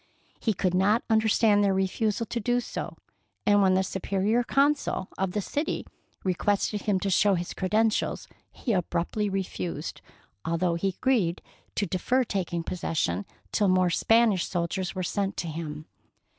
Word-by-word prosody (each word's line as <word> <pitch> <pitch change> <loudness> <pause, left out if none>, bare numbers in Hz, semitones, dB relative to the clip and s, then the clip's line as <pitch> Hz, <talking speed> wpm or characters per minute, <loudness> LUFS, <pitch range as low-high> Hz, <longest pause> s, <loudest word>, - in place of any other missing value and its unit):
He 220 -3 0
could 180 0 0
not 200 +5 +3
understand 220 -1 +4
their 195 -1 +2
refusal 205 +3 0
to 235 - -3
do 245 +3 +1
so, 245 - -5 0.5
and 205 0 +5
when 190 -1 +4
the 190 - +3
Superior 195 +5 0
Council 280 -7 +1
of 190 -1 -2
the 210 - 0
city 295 - -2 0.4
requested 200 +2 0
him 200 -3 +1
to 200 - 0
show 200 +2 +4
his 175 0 -4
cre 185 - -2
dentials, 220 +2 +1 0.3
he 235 - -2
abruptly 180 +3 -1
refused, 180 - -4 0.4
although 170 +1 0
he 170 +4 -1
agreed 195 -3 0 0.3
to 205 - +1
defer 250 +8 +1
taking 180 -6 -2
possession 125 - -2 0.2
till 205 - +2
more 185 -1 +3
Spanish 225 -1 +3
soldiers 180 +2 -2
were 185 - -2
sent 195 +2 -1
to 170 - -2
him. 155 -1 -5
195 Hz, 155 wpm, -27 LUFS, 180-215 Hz, 0.5 s, and